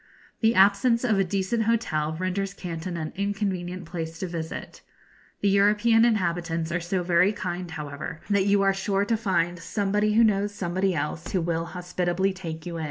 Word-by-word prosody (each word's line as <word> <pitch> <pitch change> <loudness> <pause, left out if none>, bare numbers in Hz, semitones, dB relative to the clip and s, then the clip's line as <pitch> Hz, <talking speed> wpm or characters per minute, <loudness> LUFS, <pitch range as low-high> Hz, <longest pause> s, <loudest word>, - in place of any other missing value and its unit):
The 225 0 +3
absence 200 +5 +4
of 215 -5 +2
a - - +4
decent 200 +4 -1
hotel 160 -10 0
renders 195 +2 -2
Canton 170 0 -5
an 155 -2 -4
inconvenient 190 -3 -2
place 165 -1 -5
to 185 - -3
visit. 165 -2 -6 0.6
The 205 - +3
European 210 +3 +4
inhabitants 170 -6 0
are 170 - 0
so 180 +2 -2
very 175 +2 +4
kind, 180 -3 -4
however, 150 0 -6
that 200 -1 +2
you 200 0 +4
are 195 0 +4
sure 195 +1 0
to 225 - +1
find 175 -5 0
somebody 205 +4 0
who 230 +2 +5
knows 205 -1 +1
somebody 185 0 0
else 150 +2 -3
who 185 - +2
will 165 0 -1
hospitably 180 +2 -1
take 165 -4 -7
you 170 -1 -5
in. - - -4
185 Hz, 175 wpm, -26 LUFS, 170-205 Hz, 0.6 s, who